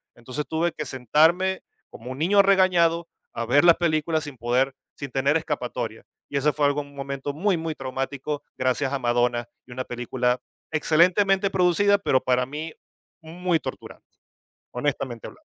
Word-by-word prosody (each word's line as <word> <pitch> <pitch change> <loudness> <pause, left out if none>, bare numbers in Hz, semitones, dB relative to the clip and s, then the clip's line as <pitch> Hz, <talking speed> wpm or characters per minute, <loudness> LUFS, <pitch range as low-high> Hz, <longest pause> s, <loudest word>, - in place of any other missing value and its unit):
Entonces, 130 +5 -5
tuve 165 +1 0
que 150 - -5
sentarme 160 +10 +2 0.3
como 125 +3 -9
un 130 - -6
niño 200 +5 +5
regañado 175 -4 +3 0.3
a 115 - -3
ver 140 +6 +4
las 170 - +8
películas 160 -1 0
sin 145 -2 -8
poder 125 +3 +1 0.2
sin 140 -3 -7
tener 140 +4 +2
escapatoria. 125 -8 -4 0.3
Y 140 - -2
ese 150 +2 +2
fue 145 -1 +1
algo, 145 +1 0
un 140 0 -14
momento 140 +1 -4
muy, 185 +4 +1
muy 160 -1 -4
traumático 135 +2 -4
gracias 130 +1 0
a - - +1
Madonna, 120 -1 +1 0.2
y - - -14
una 130 +1 -4
película 125 +1 -1 0.3
excelentemente 185 +5 +3
producida, 190 +3 +3
pero 130 -9 +2
para 125 0 +1
mí 155 +3 -6 0.5
muy 170 +1 -1
torturante, - - -8 0.7
honestamente 125 -2 -3
hablando. - - -16
145 Hz, 160 wpm, -24 LUFS, 130-170 Hz, 0.7 s, las